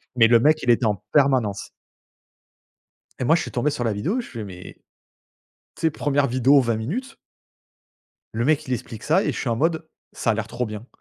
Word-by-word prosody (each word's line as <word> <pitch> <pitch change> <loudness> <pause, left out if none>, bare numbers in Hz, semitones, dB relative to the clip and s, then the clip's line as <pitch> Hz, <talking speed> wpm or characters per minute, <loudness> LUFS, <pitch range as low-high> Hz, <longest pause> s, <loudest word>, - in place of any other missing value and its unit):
Mais 115 -2 +6
le 115 0 +5
mec 155 +5 +3
il 125 - -1
était 120 0 +4
en 105 -2 +2 0.2
permanence 130 -9 +2 1.5
et - - -1
moi 155 +6 +4
je 170 - 0
suis - - -6
tombé 135 +3 0
sur 135 -4 -3
la 115 -3 0
vidéo, 165 - -1
je - - -12
fais: 115 -4 -7
«Mais», 90 -3 -10 1.0
tu - - -14
sais, 160 - +3
première 145 -2 0
vidéo 130 +3 +4
20 115 -3 0
minutes 240 - -5 1.2
le 115 +2 -1
mec 155 0 +1
il 130 - -1
explique 115 -2 -6
ça - - +2
et - - 0
je - - -6
suis - - -2
en 115 - +1
mode, 160 +4 -1 0.3
ça 115 - 0
a - - +1
l'air 110 0 -3
trop 120 +2 -3
bien 110 +1 -8
125 Hz, 215 wpm, -23 LUFS, 115-150 Hz, 1.5 s, Mais